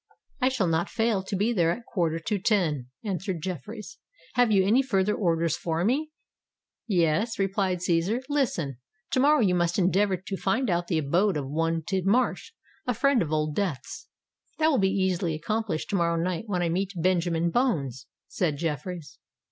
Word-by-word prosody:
"I 255 - +4
shall 255 -7 0
not 165 0 0
fail 225 -3 +1
to 190 +1 -4
be 210 +5 +1
there 170 -6 +2
at 170 - 0
a 240 - -13
quarter 170 -8 -1
to 200 +5 -2
ten," 165 - +1 0.2
answered 190 -3 -3
Jeffreys. 190 - -6 0.3
"Have 245 -2 +3
you 195 -2 +4
any 230 +7 +4
further 210 -6 +1
orders 170 -5 +1
for 165 0 -1
me?" 285 +7 +1 0.8
"Yes," 185 +3 +1
replied 195 -2 0
Cæsar: 180 +9 +1
"listen! 230 - -1 0.3
To - - +2
morrow 290 +2 +5
you 190 -5 +3
must 175 -1 +1
endeavour 190 +1 +2
to 190 +2 -6
find 200 +4 0
out 175 0 0
the 165 - 0
abode 170 +6 +2
of 140 -2 -3
one 165 +3 -1
Tidmarsh, 195 - 0 0.4
a 245 - +1
friend 275 +1 +3
of 160 -3 -2
Old 155 -1 0
Death's." 190 - -3 0.5
"That 315 0 +3
will 280 - +2
be 190 -1 +3
easily 185 -4 0
accomplished 215 0 -2
to - - +1
morrow 170 -2 +2
night 175 +3 -2
when 180 -4 0
I 170 - +1
meet 190 +4 -1
Benjamin 170 -1 +1
Bones," 140 - 0 0.2
said 155 -6 -1
Jeffreys. 160 0 -4
185 Hz, 180 wpm, -27 LUFS, 165-215 Hz, 0.8 s, morrow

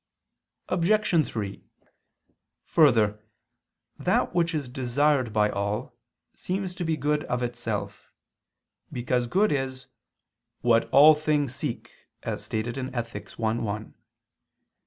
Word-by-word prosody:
Obj. 180 -2 +2
3: 100 -3 -5 1.0
Further, 110 -9 +3 0.8
that - - +1
which 170 -1 +1
is 145 -4 -2
desired 130 +1 +1
by 105 -1 +2
all, 105 +5 -3 0.4
seems 185 0 -3
to 180 - -4
be 160 -2 0
good 150 +1 0
of 125 0 -2
itself: 120 0 -4 0.8
because 125 0 -1
good 200 - +2
is 135 -2 -2 0.8
"what 115 -1 +3
all 150 +3 +8
things 150 -3 0
seek," 130 -2 -5 0.3
as - - -4
stated 115 +4 -3
in 130 0 -4
Ethic. 115 -4 -5
i, 110 -1 +1
1. 110 -2 -4
130 Hz, 115 wpm, -26 LUFS, 115-155 Hz, 1.0 s, all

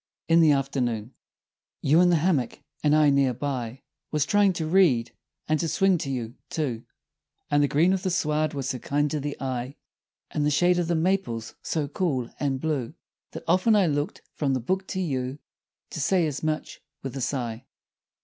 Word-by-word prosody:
"] - - -68
In 165 - +7
the 160 -2 +6
Afternoon 125 -5 -1 0.7
You 155 +5 +5
in 180 - +5
the 175 - +4
hammock; 155 -6 0 0.2
and 150 0 +4
I, 150 -2 +5
near 135 -3 +2
by, 130 -1 -4 0.3
Was 150 -1 +1
trying 205 -1 +4
to 165 -2 -3
read, 155 -9 +3 0.4
and 155 0 +1
to 170 - 0
swing 190 +1 +2
you, 125 -4 -4 0.2
too; 125 -8 -3 0.7
And 145 0 +4
the 145 - +4
green 165 +7 +3
of 190 - -1
the 185 - -1
sward 155 -3 0
was 135 -1 -3
so 125 - -3
kind 145 +4 0
to 155 - -1
the 145 0 -5
eye, 130 0 -3 0.6
And 150 - -1
the 150 - +3
shade 175 +4 +3
of 175 - 0
the 170 - +1
maples 160 -10 -1
so 155 -3 -2
cool 140 -6 -1
and 135 -2 0
blue, 145 -2 -2 0.4
That - - -7
often 185 +6 +4
I 200 -3 +4
looked 145 -2 -2
from 135 -3 0
the - - 0
book 190 +10 -2
to 190 - -3
you 135 -6 -2 0.5
To - - -5
say 180 +3 +3
as 145 -3 -3
much, 155 -1 -3 0.2
with 135 -1 -5
a 135 - -4
sigh. 120 -2 -3
145 Hz, 195 wpm, -26 LUFS, 130-170 Hz, 0.7 s, In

